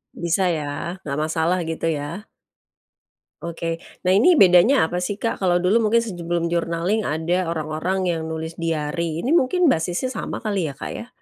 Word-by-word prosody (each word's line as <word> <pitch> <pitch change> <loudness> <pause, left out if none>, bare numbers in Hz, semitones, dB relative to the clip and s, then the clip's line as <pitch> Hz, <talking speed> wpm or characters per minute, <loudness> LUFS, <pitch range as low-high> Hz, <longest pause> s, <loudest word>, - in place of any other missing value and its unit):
Bisa 170 +2 0
ya, 160 -4 0 0.4
nggak 140 -1 -3
masalah 160 +3 0
gitu 165 0 -2
ya? 160 +8 -5 1.1
Oke. 165 0 -4 0.2
Nah 180 - 0
ini 355 - +6
bedanya 185 - +5
apa 175 - -3
sih 180 +3 -1
Kak, 230 - -1
kalau 180 -2 +2
dulu 185 +6 +3
mungkin 230 +1 +3
sebelum 175 -5 -2
journaling 170 +5 0
ada 170 +4 0
orang-orang 170 +4 -2
yang 165 -2 -1
nulis 160 0 -5
diary 165 0 -2
ini 255 - -2
mungkin 340 +1 +3
basisnya 175 +7 0
sama - - -5
kali 200 -6 -1
ya - - -7
Kak 140 - -7
ya? 235 - -7
175 Hz, 165 wpm, -22 LUFS, 160-200 Hz, 1.1 s, ini